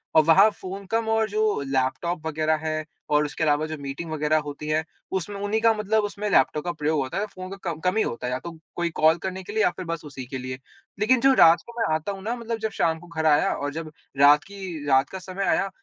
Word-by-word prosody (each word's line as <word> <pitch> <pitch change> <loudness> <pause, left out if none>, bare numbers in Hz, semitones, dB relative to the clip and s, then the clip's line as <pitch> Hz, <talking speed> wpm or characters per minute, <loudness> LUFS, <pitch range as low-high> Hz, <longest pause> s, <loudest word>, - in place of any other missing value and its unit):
और 155 - +7
वहाँ 195 +7 +7
फ़ोन 195 0 -8
कम 225 0 +1
और 220 -1 +2
जो 215 -6 +1
लैपटॉप 135 +6 -1
वग़ैरह 155 0 +1
है 155 0 -1 0.3
और 150 0 +3
उसके 150 +2 -3
अलावा 150 0 +2
जो 155 - -5
मीटिंग 140 +4 -6
वग़ैरह 155 0 +1
होती 145 +1 -7
हैं, 155 +1 +1 0.3
उसमें 190 +2 -3
उन्ही 205 +2 0
का 225 -1 +5
मतलब 215 0 +1
उसमें 205 0 -3
लैपटॉप 150 -2 +3
का 175 - 0
प्रयोग 155 -2 0
होता 130 +7 -4
है, 205 - 0
फ़ोन 185 -3 -9
का 195 - -6
कम 155 - -7
कम 180 +4 0
ही 220 - +4
होता 120 +1 -4
है, 125 - -2
या 130 - -2
तो 170 +5 -7 0.2
कोई 175 -1 0
कॉल 160 0 +3
करने 190 +1 -5
के 205 - -8
लिए 220 0 +2
या - - +5
फिर 185 - -5
बस 165 -1 -4
उसी 135 -3 -8
के 130 +1 -6
लिए। 130 0 -6 0.4
लेकिन 245 +4 +4
जो 270 +1 +6
रास्ते 170 0 +5
मैं 160 -8 +1
आता 160 +6 -3
हूँ 195 -1 -8
ना 235 +3 -2
मतलब 230 -1 -4
जब 220 0 -2
शाम 160 -4 0
को 175 - -14
घर 160 -2 -3
आया 150 -2 +4
और 145 0 -3
जब 160 -1 -6 0.3
रात 145 +1 +6
की 190 -7 -7
रात 135 +1 +4
का 190 - -6
समय 185 +1 -5
आया 195 - +1
165 Hz, 260 wpm, -25 LUFS, 150-200 Hz, 0.4 s, और